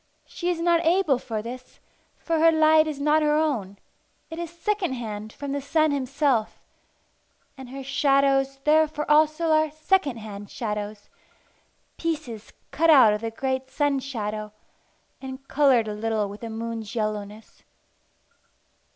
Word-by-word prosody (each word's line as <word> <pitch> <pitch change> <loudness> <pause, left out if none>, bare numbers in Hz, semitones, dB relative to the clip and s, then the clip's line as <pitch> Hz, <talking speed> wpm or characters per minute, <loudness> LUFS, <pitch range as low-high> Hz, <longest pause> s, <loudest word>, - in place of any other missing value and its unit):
She 350 - -4
is 350 -2 -1
not 340 0 +2
able 330 -5 +2
for 220 -4 -5
this, 255 +2 -9 0.4
for 330 -1 -1
her 330 +1 +6
light 315 0 +4
is 300 -2 -4
not 300 +2 +3
her 300 0 +2
own; 245 -11 -1 0.5
it 325 - -6
is 340 -1 -4
second 360 -1 -2
hand 215 -3 -6
from 285 +3 -6
the 285 0 -2
sun 310 +2 +1
himself; 270 -4 -1 0.9
and 265 -3 -11
her 270 +1 -7
shadows 275 0 +2
therefore 305 0 +2
also 310 +2 +3
are 310 0 +3
second 310 -3 0
hand 205 -2 -9
shadows, 210 -2 -5 0.9
pieces 255 -10 -4 0.2
cut 330 +2 +2
out 255 -9 +7
of 210 - -3
the 225 - -3
great 260 +3 -3
sun 285 -1 0
shadow, 215 -5 -5 0.7
and 265 0 -9
coloured 265 -6 +3
a 210 - -3
little 215 -1 -1
with 205 +1 -10
the 230 - -6
moon's 225 0 -5
yellowness. 215 -1 -5
275 Hz, 145 wpm, -25 LUFS, 225-310 Hz, 0.9 s, out